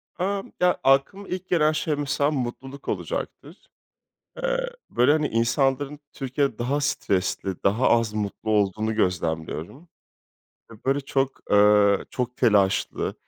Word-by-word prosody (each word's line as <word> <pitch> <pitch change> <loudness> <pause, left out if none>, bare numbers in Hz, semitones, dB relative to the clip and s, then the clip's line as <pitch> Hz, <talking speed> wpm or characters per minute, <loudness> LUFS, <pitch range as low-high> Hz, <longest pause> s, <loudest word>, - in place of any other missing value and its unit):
Amm, 195 +2 -2
ya, 180 0 +3
aklıma 140 +9 +2
ilk 185 0 -5
gelen 155 -3 +3
şey 155 -1 -1
mesela 145 0 0
mutluluk 135 0 -5
olacaktır. - - -4 0.9
Eee, - - 0 0.2
böyle, 125 +4 +3
hani, 155 -1 +2
insanların 135 +5 0
Türkiye'de 135 +1 -1
daha 140 +5 0
stresli, 95 -8 -1
daha 110 +6 +3
az 115 -2 +2
mutlu 105 +1 -4
olduğunu 110 +1 +1
gözlemliyorum. 85 - -2 0.8
Ve, - - -11
böyle, 135 +2 +1
çok, 135 -1 -2
ııı, 105 -1 +5
çok 125 -1 -3
telaşlı, 100 -5 +2
130 Hz, 120 wpm, -24 LUFS, 105-145 Hz, 0.9 s, ııı